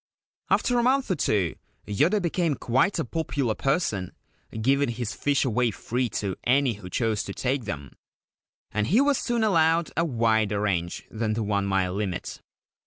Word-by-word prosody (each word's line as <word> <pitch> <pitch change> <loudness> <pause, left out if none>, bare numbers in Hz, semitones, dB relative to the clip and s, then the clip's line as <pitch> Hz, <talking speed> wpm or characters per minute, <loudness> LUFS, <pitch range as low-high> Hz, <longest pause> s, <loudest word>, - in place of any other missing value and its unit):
After 245 -1 +2
a - - +3
month 260 -1 +2
or - - +2
two 100 - +1 0.3
Yoda 155 - +2
became 170 -4 0
quite 130 +14 +1
a 165 - -1
popular 145 -7 -1
person, 110 - -1 0.5
giving 135 +4 +2
his 120 -2 -3
fish 145 -1 +1
away 125 0 +2
free 120 +4 -2
to 100 -4 -3
any 130 0 +3
who 95 -3 -10
chose 110 +1 0
to 100 - -6
take 130 -1 -1
them, 70 - -6 0.8
and 105 +1 0
he 210 +9 +4
was 280 -1 +3
soon 235 -2 0
allowed 165 -4 +3
a 165 - +2
wider 110 -7 +1
range 90 -5 -1
than 110 -1 -1
the 110 +1 -1
one 100 -1 0
mile 95 -2 +1
limit. 95 -3 -4
120 Hz, 170 wpm, -26 LUFS, 105-160 Hz, 0.8 s, he